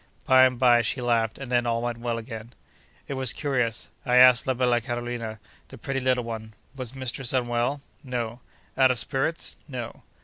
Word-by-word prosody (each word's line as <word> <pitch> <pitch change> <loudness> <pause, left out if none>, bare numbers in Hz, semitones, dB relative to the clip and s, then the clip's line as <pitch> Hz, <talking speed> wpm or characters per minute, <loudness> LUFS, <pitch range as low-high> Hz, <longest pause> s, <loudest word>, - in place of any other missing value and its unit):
By 130 0 +7
and 125 -1 +1
by, 120 -1 +5
she 115 +3 -1
laughed, 115 -2 +1
and 135 -2 -8
then 120 -1 +2
all 115 0 +1
went 120 -1 -3
well 120 -1 -2
again. 115 0 -8 0.5
It - - -4
was 130 -3 0
curious. 125 -6 -1 0.2
I 125 -3 +1
asked 125 -1 +7
la 130 - +1
bella 120 -1 +2
Carolina, 120 -2 -4 0.3
the - - -12
pretty 135 -1 -3
little 125 -1 +1
one, 110 -1 -7 0.2
Was 130 -1 -6
mistress 130 -1 -3
unwell?—No.—Out 120 -1 -2
of 125 - +1
spirits?—No. 135 -2 -3
120 Hz, 165 wpm, -26 LUFS, 115-130 Hz, 0.5 s, By